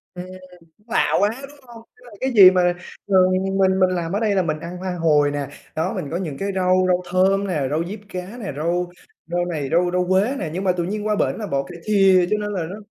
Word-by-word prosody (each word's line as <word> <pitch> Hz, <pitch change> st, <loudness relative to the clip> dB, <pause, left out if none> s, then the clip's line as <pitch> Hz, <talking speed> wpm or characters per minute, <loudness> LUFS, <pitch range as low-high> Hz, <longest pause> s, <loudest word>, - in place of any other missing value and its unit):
Ừm, 180 Hz, -, -6 dB, 0.5 s
cũng 210 Hz, -, -33 dB
lạ 240 Hz, -, +1 dB
quá, 205 Hz, +1 st, +3 dB
đúng 285 Hz, +1 st, -12 dB
hông? 235 Hz, -2 st, -13 dB
Tức 250 Hz, -, -22 dB
là 240 Hz, -, -14 dB
cái 260 Hz, 0 st, -1 dB
gì 195 Hz, -5 st, +9 dB
mà 180 Hz, -1 st, +2 dB, 0.4 s
mà 195 Hz, -, +3 dB, 0.3 s
mình 195 Hz, 0 st, -2 dB, 0.2 s
mình 185 Hz, 0 st, +4 dB
làm 175 Hz, -1 st, -3 dB
ở 205 Hz, -, -1 dB
đây 210 Hz, -3 st, +1 dB
là 190 Hz, -, +2 dB
mình 155 Hz, -2 st, -3 dB
ăn 170 Hz, +2 st, -7 dB
hoa 185 Hz, -1 st, -4 dB
hồi 150 Hz, -3 st, +3 dB
nè, 145 Hz, -1 st, -3 dB, 0.3 s
đó, 165 Hz, +4 st, -1 dB
mình 140 Hz, -, -5 dB
có 165 Hz, -, -2 dB
những 165 Hz, -7 st, -4 dB
cái 195 Hz, 0 st, -2 dB
rau 185 Hz, 0 st, +2 dB
rau 180 Hz, 0 st, +2 dB
thơm 195 Hz, +2 st, +2 dB
nè, 155 Hz, -7 st, -1 dB
rau 160 Hz, +3 st, 0 dB
diếp 210 Hz, +1 st, -7 dB
cá 185 Hz, +3 st, -7 dB
nè, 200 Hz, -9 st, -5 dB
rau 175 Hz, +3 st, -1 dB, 0.4 s
rau 175 Hz, +1 st, -1 dB
này, 155 Hz, -6 st, -3 dB
rau 175 Hz, +2 st, +2 dB
rau 180 Hz, 0 st, 0 dB
quế 195 Hz, +8 st, +2 dB
nè, 160 Hz, -, -4 dB
nhưng 185 Hz, +3 st, -4 dB
mà 185 Hz, -, +3 dB
tự 175 Hz, -1 st, -2 dB
nhiên 210 Hz, +3 st, -4 dB
qua 210 Hz, -, +1 dB
bển -, -, 0 dB
là 210 Hz, -, -4 dB
bỏ 140 Hz, -4 st, -1 dB
cải 170 Hz, +4 st, -11 dB
thìa 195 Hz, -4 st, +4 dB
cho 215 Hz, -, +2 dB
nên 205 Hz, 0 st, -3 dB
là 185 Hz, -4 st, -2 dB
nó 200 Hz, -, -6 dB
185 Hz, 265 wpm, -21 LUFS, 170-200 Hz, 0.5 s, gì